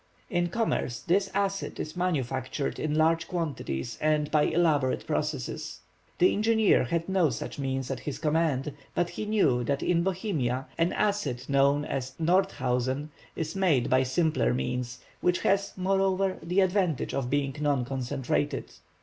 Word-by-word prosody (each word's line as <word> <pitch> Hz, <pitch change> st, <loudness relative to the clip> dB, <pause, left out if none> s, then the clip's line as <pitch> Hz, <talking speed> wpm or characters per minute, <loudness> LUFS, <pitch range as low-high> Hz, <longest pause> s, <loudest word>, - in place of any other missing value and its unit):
In 175 Hz, -1 st, +1 dB
commerce 170 Hz, -, -1 dB
this 195 Hz, +3 st, +1 dB
acid 195 Hz, 0 st, -1 dB
is 155 Hz, -, -5 dB
manufactured 135 Hz, -6 st, -2 dB
in 155 Hz, -1 st, -1 dB
large 165 Hz, +2 st, +2 dB
quantities 140 Hz, -, -3 dB
and 150 Hz, -1 st, +1 dB
by 150 Hz, -1 st, +4 dB
elaborate 150 Hz, -6 st, +2 dB
processes. 150 Hz, -4 st, -3 dB, 0.4 s
The 180 Hz, -, +4 dB
engineer 220 Hz, -, +3 dB
had 165 Hz, +5 st, -1 dB
no 190 Hz, -5 st, +3 dB
such 120 Hz, +3 st, -5 dB
means 135 Hz, -1 st, -2 dB
at 135 Hz, -, -3 dB
his 145 Hz, -, -5 dB
command, 150 Hz, -3 st, 0 dB, 0.2 s
but 175 Hz, 0 st, 0 dB
he -, -, -4 dB
knew 150 Hz, -, +2 dB
that 140 Hz, +1 st, -1 dB
in 170 Hz, -1 st, +2 dB
Bohemia 170 Hz, -, -1 dB
an 165 Hz, +1 st, +1 dB
acid 180 Hz, -13 st, -1 dB
known 140 Hz, +1 st, +3 dB
as 130 Hz, -3 st, -4 dB
Nordhausen 145 Hz, -6 st, +1 dB, 0.3 s
is 160 Hz, +1 st, -3 dB
made 170 Hz, -10 st, +2 dB
by 130 Hz, 0 st, +5 dB
simpler 130 Hz, -, +1 dB
means, 125 Hz, -, -3 dB, 0.2 s
which 180 Hz, 0 st, +1 dB
has, 200 Hz, 0 st, +1 dB
moreover, 190 Hz, 0 st, +1 dB
the 180 Hz, +4 st, +1 dB
advantage 185 Hz, -6 st, +1 dB
of 130 Hz, -3 st, -1 dB
being 140 Hz, -1 st, 0 dB
non 145 Hz, -4 st, +1 dB
concentrated. 130 Hz, 0 st, -2 dB
155 Hz, 150 wpm, -28 LUFS, 130-180 Hz, 0.4 s, by